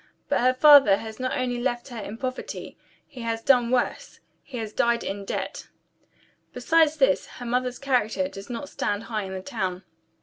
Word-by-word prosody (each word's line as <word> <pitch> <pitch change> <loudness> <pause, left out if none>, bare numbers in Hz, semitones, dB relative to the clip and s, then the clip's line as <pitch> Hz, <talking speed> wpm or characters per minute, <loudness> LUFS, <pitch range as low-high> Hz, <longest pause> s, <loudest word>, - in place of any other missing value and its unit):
But - - +2
her 255 +1 +3
father 275 -7 +8
has 220 +1 -8
not 255 0 -1
only 245 -1 -1
left 240 +1 -2
her 240 -2 -7
in 210 +1 -7
poverty, 255 +1 -5 0.3
he 265 -5 -11
has 225 -1 -3
done 250 -4 +4
worse 250 0 -1 0.2
he 260 - -9
has 220 -2 -5
died 235 0 +1
in 200 0 -5
debt. - - -4 0.9
Besides 320 -2 +3
this, 280 0 +2
her 245 - -7
mother's 250 +1 -1
character 265 0 0
does 195 -7 -10
not 245 +4 -5
stand 205 -4 -2
high 215 -4 -3
in 190 - -7
the 185 - -6
town. 190 -5 -3
245 Hz, 180 wpm, -25 LUFS, 220-260 Hz, 0.9 s, father